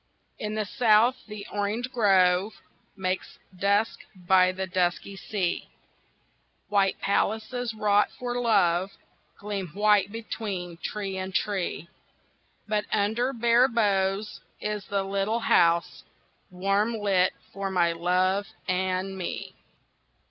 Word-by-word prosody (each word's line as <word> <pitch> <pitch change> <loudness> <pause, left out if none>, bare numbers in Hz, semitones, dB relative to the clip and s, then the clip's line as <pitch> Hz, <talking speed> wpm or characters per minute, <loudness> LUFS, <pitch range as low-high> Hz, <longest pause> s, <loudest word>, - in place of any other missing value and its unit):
In 210 0 -3
the 215 -1 -1
South 230 +2 +4
the 210 -1 -8
orange 210 +5 -2
grove 195 -3 +3 0.4
Makes 185 -1 -3 0.2
dusk 200 +4 +1 0.2
by 185 0 +4
the 190 +1 -4
dusky 185 +1 -1
sea, 185 -1 -3 1.0
White 200 -2 +2
palaces 225 +4 -1
wrought 210 -1 +3
for 245 0 -3
love 190 -5 +3 0.5
Gleam 200 -2 -4
white 205 -1 +3
between 200 -6 -5
tree 195 +1 -4
and 190 +1 -5
tree, 190 -5 -1 0.8
But 210 -1 0
under 220 +5 +1
bare 235 0 +4
boughs 205 -3 0 0.2
Is 210 -1 -3
the 200 -1 -1
little 200 +4 -1
house 170 -3 +2 0.5
Warm 195 +5 0
lit 195 -3 +2 0.2
for 195 0 -3
my 175 -3 +2
love 185 +4 +1 0.2
and 185 +1 -1
me. 185 -2 -5
200 Hz, 110 wpm, -26 LUFS, 185-215 Hz, 1.0 s, South